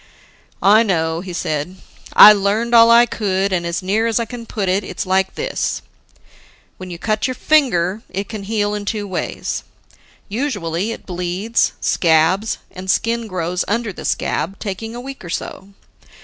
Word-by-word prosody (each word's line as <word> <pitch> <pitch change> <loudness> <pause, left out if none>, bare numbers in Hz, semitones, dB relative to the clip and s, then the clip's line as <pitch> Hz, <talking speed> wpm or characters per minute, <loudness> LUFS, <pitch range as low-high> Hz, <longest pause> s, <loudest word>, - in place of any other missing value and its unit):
"I 210 +3 +6
know," 165 -6 0
he 185 0 -7
said, 155 0 -3 0.4
"I 210 - +10
learned 210 +4 0
all 230 0 +8
I 235 +1 +7
could, 195 -4 -1
and 175 -2 -1
as 170 +1 -3
near 215 +5 +1
as 230 0 +1
I 230 - -1
can 235 0 -9
put 205 -4 -3
it, 190 +3 +1
it's - - -5
like 190 +1 +1
this: - - -2 0.9
When 185 0 -8
you 175 - -6
cut 215 +6 -1
your 255 - -3
finger, 215 - +2
it 195 +2 -4
can 215 -3 -7
heal 205 -1 0
in 205 -1 -4
two 210 0 -2
ways. 185 -2 -4 0.6
Usually 205 - -2
it - - -8
bleeds, 180 +5 -1
scabs, 170 +6 +2
and 185 +1 -8
skin 230 +3 0
grows 180 -2 -2
under 230 0 -1
the - - -9
scab, 190 +5 -2
taking 225 +3 -5
a - - -6
week 270 -1 -9
or 175 - -8
so. 190 +2 -5
200 Hz, 170 wpm, -19 LUFS, 185-225 Hz, 0.9 s, I